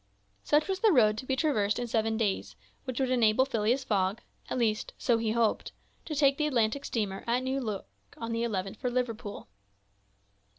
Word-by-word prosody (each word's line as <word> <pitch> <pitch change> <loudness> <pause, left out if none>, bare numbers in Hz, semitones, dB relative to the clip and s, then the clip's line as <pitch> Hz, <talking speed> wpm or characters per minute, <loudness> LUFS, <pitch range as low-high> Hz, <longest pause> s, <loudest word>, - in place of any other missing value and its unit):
Such 300 +1 +2
was 385 -1 -1
the 440 +1 +5
road 215 -8 +5
to 260 - -8
be 265 - +1
traversed 215 -9 +1
in 245 - -2
seven 225 -1 0
days, 190 - -1 0.3
which 255 -1 -4
would 260 -1 +1
enable 240 0 +4
Phileas 240 +1 0
Fogg—at 200 +1 -2
least, 220 -3 0
so 235 -2 +2
he 220 -1 0
hoped—to 235 +6 -2
take 280 -1 +3
the 300 - +2
Atlantic 255 0 +1
steamer 200 -4 -2
at 245 +2 +1
New 265 +1 -1
York 215 -5 -4 0.3
on 230 0 -5
the 230 0 -1
11th 195 -3 -2
for 250 - -2
Liverpool. 230 - -3
235 Hz, 175 wpm, -29 LUFS, 215-260 Hz, 0.3 s, the